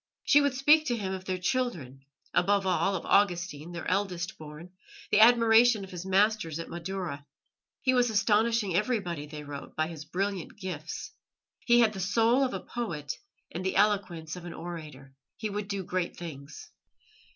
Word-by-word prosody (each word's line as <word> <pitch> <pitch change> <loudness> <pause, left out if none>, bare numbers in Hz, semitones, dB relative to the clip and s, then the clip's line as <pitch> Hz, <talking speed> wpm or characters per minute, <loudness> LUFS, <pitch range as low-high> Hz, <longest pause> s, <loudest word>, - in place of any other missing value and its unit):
She 290 - +5
would 285 -2 +1
speak 300 +4 +5
to 240 - 0
him 190 -3 -3
of 190 0 -6
their 185 -1 -2
children 180 - -2 0.3
above 200 +1 +2
all, 190 +1 +1
of 175 - -4
Augustine, 175 -5 +1
their 175 0 -6
eldest 185 -2 -1
born, 155 +3 -10 0.4
the - - +5
admiration 230 -1 +6
of 190 - -10
his 180 +1 -7
masters 195 -4 +2
at 165 - -6
Madaura. 170 -4 -5 0.6
He 255 - +3
was 245 -1 +3
astonishing 215 -2 +2
everybody, 185 -8 -1
they 150 0 -8
wrote, 145 -1 -8
by 155 - +1
his 155 -2 -8
brilliant 190 +2 -3
gifts. 180 -5 -6 0.5
He 240 0 +4
had 220 -2 +3
the 195 - -6
soul 225 +7 +3
of 260 - -1
a - - -4
poet 170 -12 -4 0.4
and 175 - -5
the 190 - -1
eloquence 190 -6 +1
of 180 - -9
an 175 - -7
orator; 155 -6 -8 0.2
he 215 -1 -3
would 205 0 -4
do 200 -1 -3
great 185 -1 -3
things. 150 -4 -9
190 Hz, 175 wpm, -29 LUFS, 165-215 Hz, 0.6 s, admiration